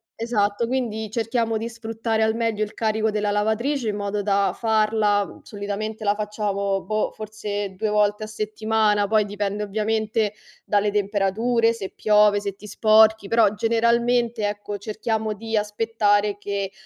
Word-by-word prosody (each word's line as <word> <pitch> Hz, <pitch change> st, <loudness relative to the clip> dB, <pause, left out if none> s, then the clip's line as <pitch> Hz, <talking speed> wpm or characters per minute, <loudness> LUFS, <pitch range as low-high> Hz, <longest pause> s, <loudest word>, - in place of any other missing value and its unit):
esatto. 225 Hz, -1 st, 0 dB
Quindi 225 Hz, -4 st, -2 dB
cerchiamo 230 Hz, 0 st, -1 dB
di 225 Hz, +1 st, -3 dB
sfruttare 225 Hz, -1 st, -3 dB
al 220 Hz, 0 st, +2 dB
meglio 225 Hz, -2 st, 0 dB
il 210 Hz, -, -6 dB
carico 220 Hz, 0 st, 0 dB
della 210 Hz, -1 st, -1 dB
lavatrice 220 Hz, +4 st, 0 dB
in 205 Hz, -, -2 dB
modo 205 Hz, 0 st, -2 dB
da 200 Hz, 0 st, +1 dB
farla 215 Hz, -2 st, +1 dB
solitamente 210 Hz, +1 st, -5 dB
la 205 Hz, -, +3 dB
facciamo 200 Hz, -2 st, -2 dB
boh, 215 Hz, +2 st, -1 dB
forse 205 Hz, -2 st, -5 dB
2 215 Hz, +3 st, -1 dB
volte 210 Hz, 0 st, +1 dB
a -, -, -9 dB
settimana, 215 Hz, -1 st, 0 dB
poi 215 Hz, 0 st, +3 dB
dipende 205 Hz, 0 st, -3 dB
ovviamente 215 Hz, +1 st, -1 dB, 0.3 s
dalle 205 Hz, 0 st, +1 dB
temperature, 210 Hz, +3 st, +1 dB
se 195 Hz, -4 st, -6 dB
piove, 210 Hz, -1 st, +4 dB
se 200 Hz, -1 st, -5 dB
ti 210 Hz, -, -14 dB
sporchi; 220 Hz, 0 st, +4 dB
però 230 Hz, -2 st, +3 dB
generalmente, 235 Hz, 0 st, +1 dB
ecco, 205 Hz, 0 st, -5 dB
cerchiamo 215 Hz, +1 st, -2 dB
di 225 Hz, +1 st, -3 dB
aspettare 210 Hz, -1 st, +1 dB
che, 200 Hz, -1 st, -3 dB
215 Hz, 145 wpm, -23 LUFS, 205-225 Hz, 0.3 s, piove